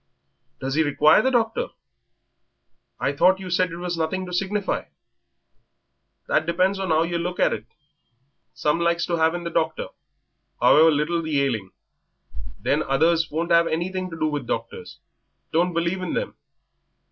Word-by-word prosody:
"Does 135 Hz, 0 st, -3 dB
he 155 Hz, -, +3 dB
require 150 Hz, +3 st, +4 dB
the 260 Hz, -, +2 dB
doctor? 245 Hz, -, 0 dB, 1.3 s
I 140 Hz, -, 0 dB
thought 185 Hz, +6 st, +3 dB
you 185 Hz, -1 st, -7 dB
said 180 Hz, 0 st, +1 dB
it 170 Hz, -, -6 dB
was 175 Hz, 0 st, -3 dB
nothing 165 Hz, +3 st, -2 dB
to 180 Hz, -, -8 dB
signify." 195 Hz, +2 st, -1 dB, 1.4 s
"That 155 Hz, -, +1 dB
depends 185 Hz, +3 st, +1 dB
on 190 Hz, -3 st, -2 dB
'ow 160 Hz, +1 st, +3 dB
yer 170 Hz, 0 st, -2 dB
looks 180 Hz, +1 st, -4 dB
at -, -, +3 dB
it. 110 Hz, +1 st, -6 dB, 0.9 s
Some 150 Hz, +2 st, 0 dB
likes 170 Hz, 0 st, +1 dB
to 170 Hz, -, -1 dB
'ave 160 Hz, +2 st, +3 dB
in 175 Hz, -, -8 dB
the 170 Hz, -, -4 dB
doctor, 160 Hz, -1 st, -1 dB, 0.7 s
however 160 Hz, +2 st, +6 dB
little 160 Hz, +3 st, 0 dB
the 155 Hz, -3 st, -1 dB
ailing; 110 Hz, -8 st, -2 dB, 0.9 s
then -, -, +1 dB
others 160 Hz, +4 st, +2 dB
won't 165 Hz, +3 st, -2 dB
'ave 170 Hz, 0 st, +4 dB
anything 185 Hz, +3 st, -2 dB
to 165 Hz, -, -8 dB
do -, -, +1 dB
with 145 Hz, -5 st, -2 dB
doctors 115 Hz, 0 st, -5 dB, 0.5 s
don't 175 Hz, +3 st, +2 dB
believe 170 Hz, +2 st, -1 dB
in 185 Hz, -, -3 dB
them. -, -, -3 dB
170 Hz, 160 wpm, -23 LUFS, 155-180 Hz, 1.4 s, however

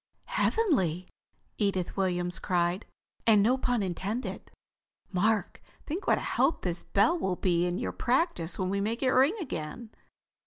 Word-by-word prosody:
"Heavenly!" 185 Hz, -, +1 dB, 0.5 s
Edith 195 Hz, -4 st, 0 dB
Williams 180 Hz, -2 st, 0 dB
cried. 175 Hz, +2 st, 0 dB, 0.4 s
"And 210 Hz, -3 st, +6 dB
no 245 Hz, +4 st, +4 dB
pun 245 Hz, -4 st, 0 dB
intended. 195 Hz, +6 st, -4 dB, 0.6 s
Mark, 210 Hz, +3 st, 0 dB, 0.2 s
think 340 Hz, +7 st, -4 dB
what -, -, +4 dB
a -, -, -3 dB
help -, -, +1 dB
this 175 Hz, -1 st, -2 dB
bell 225 Hz, -, +2 dB
will 190 Hz, -7 st, 0 dB
be 175 Hz, -1 st, +1 dB
in 175 Hz, 0 st, -1 dB
your 240 Hz, -, -2 dB
practise 245 Hz, -, 0 dB
when 185 Hz, 0 st, -1 dB
we 200 Hz, 0 st, 0 dB
make 225 Hz, +5 st, -2 dB
it 255 Hz, -, +3 dB
ring 270 Hz, -, +4 dB
again!" 220 Hz, -, -6 dB
200 Hz, 150 wpm, -29 LUFS, 180-245 Hz, 0.6 s, And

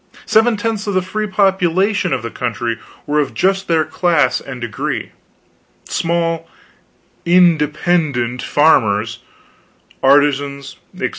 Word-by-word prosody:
Seven 225 Hz, +1 st, +3 dB
tenths 215 Hz, -1 st, -3 dB
of 200 Hz, -, -1 dB
the 185 Hz, -, +1 dB
free 215 Hz, +3 st, -3 dB
population 190 Hz, 0 st, +1 dB
of 130 Hz, -3 st, -1 dB
the 115 Hz, -, -5 dB
country 115 Hz, -1 st, -3 dB, 0.3 s
were 150 Hz, +1 st, 0 dB
of 145 Hz, -3 st, -2 dB
just 195 Hz, +1 st, +1 dB
their 160 Hz, -2 st, +2 dB
class 165 Hz, +1 st, +1 dB
and 130 Hz, -2 st, -8 dB
degree: 120 Hz, -3 st, -4 dB, 0.8 s
small 165 Hz, -1 st, -1 dB, 0.8 s
"independent" 155 Hz, -7 st, +2 dB
farmers, 115 Hz, -7 st, +2 dB, 0.8 s
artisans, 140 Hz, 0 st, +2 dB, 0.2 s
etc. -, -, -2 dB
160 Hz, 115 wpm, -17 LUFS, 135-185 Hz, 0.8 s, Seven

